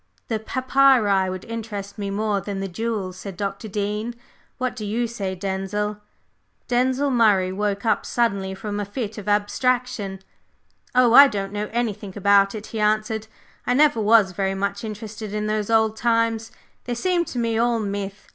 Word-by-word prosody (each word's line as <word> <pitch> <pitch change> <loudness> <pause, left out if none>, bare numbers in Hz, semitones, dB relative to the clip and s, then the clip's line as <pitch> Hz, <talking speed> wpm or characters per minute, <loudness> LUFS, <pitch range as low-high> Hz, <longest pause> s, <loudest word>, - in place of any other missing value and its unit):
"The 220 -2 0
papyri 255 -6 +3
would 185 0 -6
interest 215 -3 -6
me 200 -1 -2
more 205 0 0
than 195 +1 -4
the 195 - -2
jewels," 195 -2 -3
said 190 -1 -8
Dr. 200 +2 -4
Dean. 210 +3 -3 0.4
"What 255 -1 -2
do 225 - -6
you 220 +4 -1
say, 200 -5 -4
Denzil?" 200 +2 -3 0.7
Denzil 260 +3 +1
Murray 205 -6 +3
woke 200 +1 -2
up 220 - +2
suddenly 200 -5 0
from 205 +1 -4
a - - -1
fit 215 0 -5
of 210 0 -5
abstraction. 210 -1 0 0.8
"Oh, 250 -2 +5
I 280 +3 +10
don't 200 -5 -4
know 210 0 -3
anything 215 -4 -2
about 200 +1 +4
it," 215 0 -6
he 225 - -6
answered. 215 +1 0 0.4
"I 245 - +2
never 290 -5 +4
was 210 -2 +5
very 195 +1 -1
much 200 +1 -2
interested 215 -1 -6
in 210 0 -1
those 215 0 -1
old 220 -1 +3
times, 230 -1 +1 0.3
they 245 - -2
seem 355 +6 +1
to 250 - -7
me 230 -1 0
all 235 0 +2
myth. 200 -1 -4
210 Hz, 170 wpm, -23 LUFS, 200-230 Hz, 0.8 s, I